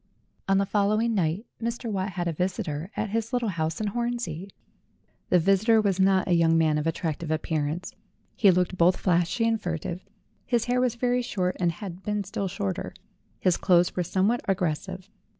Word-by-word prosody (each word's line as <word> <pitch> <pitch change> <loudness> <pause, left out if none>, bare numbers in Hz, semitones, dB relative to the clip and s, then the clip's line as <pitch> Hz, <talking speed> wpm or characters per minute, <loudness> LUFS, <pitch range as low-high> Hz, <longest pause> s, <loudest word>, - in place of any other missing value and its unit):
On 195 0 +3
the 200 - +2
following 215 +3 +1
night, 185 +2 0 0.2
Mr. 235 +1 -3
Watt 195 -2 -2
had 175 -1 -2
a 170 - -1
visitor 180 -2 -2
at 210 -1 -2
his 230 +1 -1
little 245 -3 0
house 160 -3 -2
in 215 - -1
Hornsey. 235 -5 -3 0.8
The 180 - +5
visitor 195 +6 +4
was 200 -3 +1
not 190 0 +3
a 180 - +2
young 165 -1 +4
man 155 -2 +3
of 150 - -2
attractive 165 0 -2
appearance. 155 +1 -2 0.4
He 205 - +5
looked 180 0 +1
both 180 +2 +5
flashy 180 +5 +1
and 225 -1 0
furtive; 175 0 -4 0.4
his 240 -2 0
hair 250 +1 +1
was 250 -2 +1
very 245 +1 +1
short 185 -6 -1
and 175 -2 +2
had 180 +1 -8
been 210 0 -2
still 195 0 -3
shorter; 100 - -4 0.4
his 180 -2 +2
clothes 175 -2 +3
were 180 - 0
somewhat 190 +7 +1
aggres 180 -6 +1
sive. 185 0 -9
190 Hz, 185 wpm, -26 LUFS, 170-215 Hz, 0.8 s, The